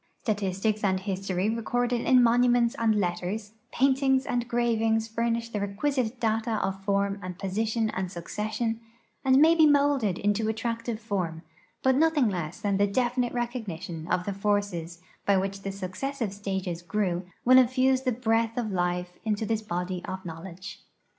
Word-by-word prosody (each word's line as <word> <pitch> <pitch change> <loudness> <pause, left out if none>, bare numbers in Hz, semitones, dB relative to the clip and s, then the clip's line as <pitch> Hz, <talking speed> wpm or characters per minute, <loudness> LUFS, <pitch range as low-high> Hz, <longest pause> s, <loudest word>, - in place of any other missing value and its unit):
Statistics 210 0 -1
and 190 -2 +2
history 190 -1 -2
recorded 240 +2 0
in 255 -1 +5
monuments 240 0 +4
and 225 -1 +3
letters, 200 +2 -2 0.2
paintings 265 0 +2
and 240 -1 -1
gravings 225 -2 +1
furnish 230 +1 -1
the 210 - -3
re(piisite 235 +4 -1
data 225 0 0
of 195 0 -4
form 200 0 0
and 180 -1 -6
position 215 +3 -1
and 185 -1 -3
succession, 215 +6 -3 0.4
and 265 -1 +5
may 315 +4 +7
be 320 -2 +6
molded 280 -9 +3
into 205 +2 0
attractive 230 0 -3
form, 180 -7 -3 0.4
I)ut 260 0 +5
nothing 305 -6 +3
less 175 -3 -4
than 200 -2 +1
definite 240 +5 +1
recog 240 -1 -3
nition 170 -1 -6
of 180 0 +1
tlie 200 +1 -4
forces 195 -5 -1 0.3
by 200 -1 +5
which 195 +1 -2
the 195 - -4
successive 200 +5 -4
stages 190 -4 -3
grew 180 0 -1 0.2
will 255 +1 +8
in 255 - +5
fuse 260 +1 +2
the 260 -1 0
breath 225 -1 0
of 225 -4 -1
life 180 -1 -2
into 220 -1 -1
this 220 0 -1
body 180 -2 -3
of 190 0 -6
knowledge. 175 +3 -8
215 Hz, 160 wpm, -27 LUFS, 190-240 Hz, 0.4 s, will